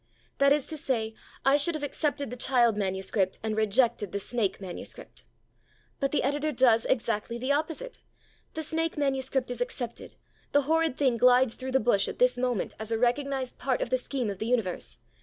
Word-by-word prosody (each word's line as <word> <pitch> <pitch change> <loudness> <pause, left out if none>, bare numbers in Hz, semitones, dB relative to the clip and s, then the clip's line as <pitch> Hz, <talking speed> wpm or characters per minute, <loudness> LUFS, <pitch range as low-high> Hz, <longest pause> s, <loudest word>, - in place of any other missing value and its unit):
That 280 0 +5
is 290 -1 +3
to 315 - -5
say, 225 -6 -1 0.3
I 275 +1 +6
should 310 +3 +1
have 305 - -4
accepted 285 -2 -2
the - - -4
child 240 -3 +3
manuscript, 190 -1 -1
and 220 -1 -1
rejected 220 -1 +2
the 200 - -2
snake 215 -1 -1
manuscript. 185 -3 -8 0.7
But 275 - +1
the 300 - +1
editor 290 +3 0
does 235 -4 +4
exactly 230 -1 -1
the 255 +3 -1
opposite. 325 +12 -2 0.6
The 315 - -2
snake 325 +1 -1
manuscript 265 -2 0
is 245 -1 -5
accepted; 245 -1 -4 0.4
the 285 0 +4
horrid 320 -1 +1
thing 260 -5 +2
glides 250 0 +5
through 260 0 -6
the 265 - +5
bush 210 -4 +2
at - - -5
this 250 0 +4
moment 245 -4 -1
as 220 +1 -5
a 225 - +1
recognized 260 +2 -1
part 260 -1 0
of - - -3
the 255 - +4
scheme 250 -4 -2
of 195 - -8
the 220 - -2
universe. 225 -7 -1
250 Hz, 190 wpm, -28 LUFS, 225-280 Hz, 0.7 s, I